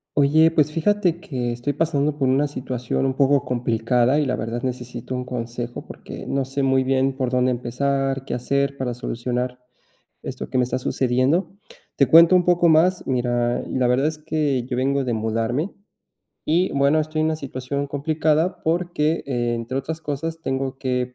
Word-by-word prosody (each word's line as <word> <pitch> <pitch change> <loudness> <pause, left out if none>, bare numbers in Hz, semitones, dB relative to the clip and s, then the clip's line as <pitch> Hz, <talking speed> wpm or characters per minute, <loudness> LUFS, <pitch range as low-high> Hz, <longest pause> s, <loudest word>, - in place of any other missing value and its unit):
Oye, 155 +3 +5
pues, 150 -2 +2
fíjate 175 0 +1
que 125 -6 -3
estoy 120 +4 -2
pasando 150 -1 0
por 135 - +1
una 135 +3 +3
situación 130 -2 -3
un 130 - +1
poco 140 0 +2
complicada 120 +2 +1
y, 150 - +1
la 130 -1 0
verdad, 115 +1 -4
necesito 125 0 -5
un 125 - -3
consejo, 120 -1 -5
porque, - - -9
no 135 -1 0
sé, 135 +1 -3
muy 135 0 +3
bien 135 +1 +1
por 130 -2 -1
dónde 125 0 +2
empezar, 135 +2 -1
qué - - -4
hacer 140 +3 0
para 130 -3 -3
solucionar 125 +1 -3 0.6
esto - - -6
que - - -1
me 125 - +4
está 125 +1 -2
sucediendo. 130 +7 +1 0.5
Te 140 - +5
cuento 165 +6 +7
un 180 - +1
poco 175 -1 +4
más, 175 +4 +3
mira, 120 -1 0
la 130 -1 0
verdad 130 +4 +2
es 155 0 -3
que 150 -4 -1
yo 125 0 -4
vengo 135 +2 +1
de 125 - -2
mudarme 115 - -1 0.7
y 175 +4 +2
bueno, 140 +3 +3
estoy 155 0 -2
en 155 - +2
una 160 - -1
situación 140 0 -4
complicada, 155 +4 0
porque, 165 -1 0
entre 120 -1 -2
otras 160 +4 -5
cosas, 160 +3 -4
tengo 135 -1 -2
que, 125 -1 -2
135 Hz, 175 wpm, -22 LUFS, 125-150 Hz, 0.7 s, cuento